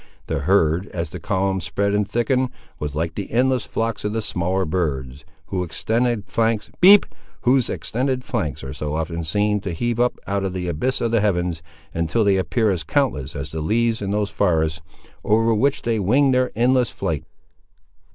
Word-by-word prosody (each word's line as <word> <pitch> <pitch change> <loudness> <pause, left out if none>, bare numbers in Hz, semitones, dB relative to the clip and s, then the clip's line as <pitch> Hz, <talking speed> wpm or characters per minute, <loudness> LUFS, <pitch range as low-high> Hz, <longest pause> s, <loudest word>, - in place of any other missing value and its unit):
The - - -2
herd, 85 +2 +2
as 85 -2 -4
the 90 - -6
column 95 +1 0
spread 100 +5 -1
and 105 -1 0
thickened, 125 +3 +1 0.3
was 75 -1 -4
like 80 +2 -1
the 100 - -5
endless 130 +1 +2
flocks 115 -1 -2
of 105 - -2
the 110 - -1
smaller 95 -1 0
birds, 70 -6 -2 0.2
whose 90 -1 -2
extended 115 +4 -1
flanks 110 +2 0 1.9
are 65 -1 -6
so 75 0 -3
often 80 +1 -3
seen 105 +6 +1
to 95 -1 -4
heave 120 +7 -2
up 125 0 +2
out 100 0 -1
of 95 -2 -2
the 90 -1 -3
abyss 105 - -1
of 115 - 0
the 115 -2 +3
heavens, 90 -5 0 0.3
until 85 +8 +1
they 100 -2 +3
appear 100 +5 +1
as 90 -4 -2
countless 80 - -1
as 70 +2 -5
the 80 - -4
leaves 115 +6 +1
in 100 - -3
those 105 0 0
forests, 80 -4 +1 0.4
over 115 +2 +3
which 135 +6 +1
they 115 -2 0
wing 130 +8 +3
their 125 0 +2
endless 125 0 +3
flight. - - -3
100 Hz, 170 wpm, -22 LUFS, 85-115 Hz, 1.9 s, the